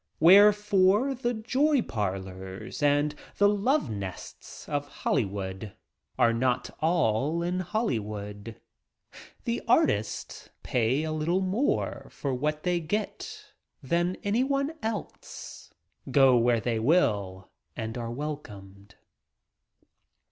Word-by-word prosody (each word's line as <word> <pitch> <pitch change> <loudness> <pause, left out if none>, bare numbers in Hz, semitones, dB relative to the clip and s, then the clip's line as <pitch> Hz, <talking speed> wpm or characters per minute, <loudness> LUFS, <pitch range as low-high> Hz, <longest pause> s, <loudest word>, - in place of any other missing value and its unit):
Wherefore, 205 - +5
the 245 -1 -2
"joy 260 +5 +2
parlors" 95 +1 -5
and 145 +1 +2 0.2
the 205 - +5
"love 205 - +1
nests" 100 -3 -8
of 145 -1 -2
Hollywood 100 -7 -3 0.4
are 115 -1 +4
not 125 +1 0
all 155 -1 +1
in 180 +1 -1
Hollywood. 110 - -3 0.8
The - - -2
"artists" 105 +1 +1
pay 125 +5 +1
a 160 - -2
little 160 +4 0
more 195 +9 -1
for 140 -2 -4
what 150 +4 -2
they 180 -1 +1
get 205 +6 -5 0.3
than 175 +6 0
anyone 275 +7 +1
else 220 -4 -6 0.2
— - - -50
go 135 -2 +5
where 120 0 +3
they 115 +1 -1
will 105 - +1 0.3
and 110 0 -4
are 120 -2 -4
welcomed. 105 -8 -7
145 Hz, 105 wpm, -28 LUFS, -, 0.8 s, Wherefore